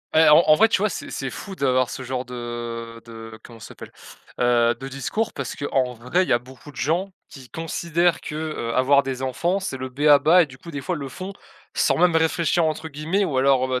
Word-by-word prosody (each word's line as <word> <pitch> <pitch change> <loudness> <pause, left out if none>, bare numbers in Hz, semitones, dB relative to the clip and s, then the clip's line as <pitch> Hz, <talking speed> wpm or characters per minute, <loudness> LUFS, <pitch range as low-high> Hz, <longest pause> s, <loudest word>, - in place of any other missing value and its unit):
Et 160 0 +6
en 150 - +8
en 155 - +7
vrai 225 +6 +4
tu - - +2
vois 215 - +2
c'est - - -6
c'est 135 - -4
fou 195 +8 -8
d'avoir 130 -5 +1
ce 130 - -6
genre 130 0 -3
de 120 -1 -6
de, 115 -1 -10
comment 115 -2 -13
ça 100 - -10
s'appelle? - - -11 0.5
Heu, 120 -1 +3
de 135 - -6
discours 140 - -3
parce 140 - -5
qu'en 130 -3 -1
vrai 125 +11 0
il - - -6
y - - +4
a 120 - +3
beaucoup 130 +3 -14
de - - -17
gens 175 +6 -1 0.2
qui 130 -3 -13
considèrent 170 +1 -1
que, - - -7
heu, 155 -7 -4
avoir 140 +3 +4
des 130 -1 -4
enfants 170 +9 -1
c'est 190 -8 -4
le 130 0 -5
b.a.-ba 150 +5 +5
et - - -3
du 130 -3 -14
coup 170 +6 -11
des 145 - -5
fois 180 +6 -3
le 140 -3 -6
font 185 +8 -7 0.4
sans - - +2
même 180 -2 +3
réfléchir 165 +1 +2
entre 160 0 -2
guillemets 160 +7 -1
ou 135 -7 -2
alors, 135 -1 +3
heu, 130 -1 -1
140 Hz, 235 wpm, -23 LUFS, 125-165 Hz, 0.5 s, en